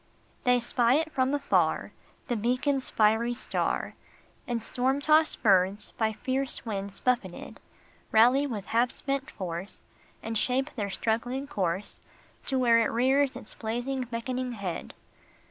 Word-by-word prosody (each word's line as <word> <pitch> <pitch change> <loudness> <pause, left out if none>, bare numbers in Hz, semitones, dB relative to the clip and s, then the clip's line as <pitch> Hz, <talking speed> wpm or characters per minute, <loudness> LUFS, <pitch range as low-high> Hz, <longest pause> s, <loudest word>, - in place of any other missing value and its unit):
HEY 250 0 +5
spy 240 +1 +2
it 320 +1 0
from 260 -1 +1
afar, 290 -1 +1 0.4
The 245 - 0
beacon 250 +6 +1
s 265 - -4
fiery 225 +3 +2
star, - - -1 0.5
And 240 -1 -1
storm 260 +4 0
tossed 310 0 +3
birds, 195 0 +3
by 220 -1 0
fierce 260 +5 -1
winds 200 -3 -4
buffeted, 235 -8 -2 0.5
Rally 250 +6 +5
with 210 -7 -5
half 235 +2 +2
spent 275 +2 -3
force. 185 - -6 0.4
And 225 0 -4
shape 260 +5 +1
their 205 -4 -2
struggling 240 +6 -1
course 190 -7 -3 0.5
To 265 - +1
where 235 -2 +5
it 230 - +2
rears 265 +3 +2
its 215 - -9
blazing, 245 +4 -3
beckoning 250 +1 -3
head. 195 -6 -5
240 Hz, 140 wpm, -28 LUFS, 220-265 Hz, 0.5 s, HEY